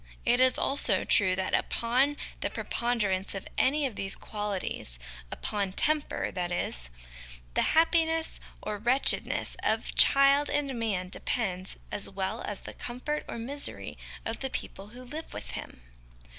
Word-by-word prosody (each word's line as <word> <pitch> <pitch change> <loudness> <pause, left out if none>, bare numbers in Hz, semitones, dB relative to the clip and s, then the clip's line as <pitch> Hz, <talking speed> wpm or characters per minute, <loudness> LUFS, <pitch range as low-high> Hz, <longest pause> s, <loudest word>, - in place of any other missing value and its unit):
It 245 - +4
is 255 0 +5
also 245 -8 +2
true 185 -2 +4
that 190 0 -2
upon 260 +5 +2 0.2
the - - -1
preponderance 205 -6 -1
of 195 - -5
any 290 +3 +3
of 250 -6 -3
these 195 0 -3
qualities 205 - -3 0.3
upon 200 -3 -2
temper, 305 +6 +1
that 180 -1 -2
is - - -2 0.6
the - - +3 0.2
happiness 325 0 +3 0.2
or 210 -1 -3
wretchedness 245 +5 +2
of - - 0
child 275 +1 +6
and 285 -2 0
man 195 -5 -1
depends, 190 -3 -1
as 205 - -3
well 195 +4 -3
as 205 - -4
the - - -8
comfort 255 +5 -4
or - - -4
misery 275 +5 -1 0.3
of 225 - -3
the 265 - -2
people 195 -5 -5
who 245 +4 -11
live 300 +6 -7
with - - -5
him. - - -7
230 Hz, 145 wpm, -29 LUFS, 195-275 Hz, 0.6 s, child